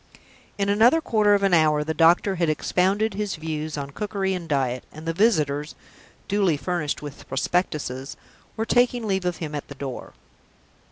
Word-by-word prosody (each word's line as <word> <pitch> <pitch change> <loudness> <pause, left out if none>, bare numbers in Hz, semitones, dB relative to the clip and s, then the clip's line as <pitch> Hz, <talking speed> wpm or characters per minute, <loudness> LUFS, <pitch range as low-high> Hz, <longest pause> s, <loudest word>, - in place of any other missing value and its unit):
In 200 -1 0
another 225 +9 +5
quarter 215 -8 +3
of 200 - 0
an 195 -2 +3
hour 155 -2 +4
the 160 +1 -2
doctor 175 +4 +4
had 170 -2 +1
expounded 190 +7 +1
his 205 0 -3
views 155 -1 -4
on 140 -1 -5
cookery 195 +2 -2
and 175 -3 -5
diet, 130 -4 0
and 155 +1 -11
the 165 - 0
visitors 155 -7 +1 0.5
(duly 195 -6 +2
furnished 150 +1 -2
with 145 -1 -9
prospectuses) 140 -3 -2 0.4
were 225 - -1
taking 245 0 +2
leave 190 -3 -1
of 180 -2 -1
him 155 -3 -5
at 145 - -5
the 145 - -10
door. 135 -2 -7
170 Hz, 170 wpm, -24 LUFS, 150-200 Hz, 0.5 s, another